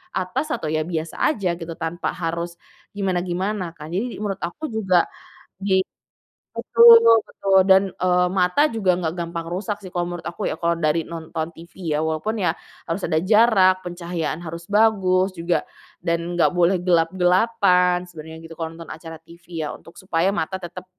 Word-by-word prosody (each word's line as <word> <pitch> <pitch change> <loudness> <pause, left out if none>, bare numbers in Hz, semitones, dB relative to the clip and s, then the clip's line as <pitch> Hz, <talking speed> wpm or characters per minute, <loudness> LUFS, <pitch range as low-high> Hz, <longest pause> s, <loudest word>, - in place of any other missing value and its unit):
atas 185 +11 -2
atau 155 -9 -4
ya 155 0 -1
biasa 165 -2 -4
aja 190 - -1
gitu 165 -1 -6
tanpa 165 +2 -3
harus, 170 0 -3 0.4
gimana-gimana 185 -1 -2
kan? 150 +1 -10
Jadi 220 +8 -2
menurut 200 -2 -3
aku 295 - -5
juga 190 -6 +2 0.6
dia 190 -1 +2
i - - +3 0.7
betul 465 0 +7 0.2
betul 195 -1 +1
dan, 190 0 +6
eee, 180 0 +2
mata 185 +11 +2
juga 210 -7 +1
nggak 165 0 -2
gampang 170 -1 -4
rusak 200 +4 -4
sih 190 - -9
kalau 175 -1 -2
menurut 175 -1 -7
aku 170 - -6
ya - - -8
kalau 170 0 +1
dari 155 0 +1
nonton 160 -1 -5
TV 170 -1 -6
ya, 155 - 0
walaupun 160 +8 -2
ya - - +2 0.3
harus 165 +4 -3
ada 160 - 0
jarak, 200 -3 +5
pencahayaan 175 -3 -4
harus 170 +2 -8
bagus 195 -3 +3
juga, 170 -1 -1 0.4
dan 170 0 -1
nggak 175 - +3
boleh 175 +1 +3
gelap-gelapan 180 +1 +3
sebenarnya 160 -2 -10
gitu 165 - -10
kalau 165 0 -4
nonton 165 0 -9
acara 165 0 -9
TV 165 0 -8
ya 150 - -4
untuk 165 - -14
supaya 180 -1 0
mata 190 -1 -2
tetep 175 +1 -8
175 Hz, 170 wpm, -22 LUFS, 165-190 Hz, 0.7 s, betul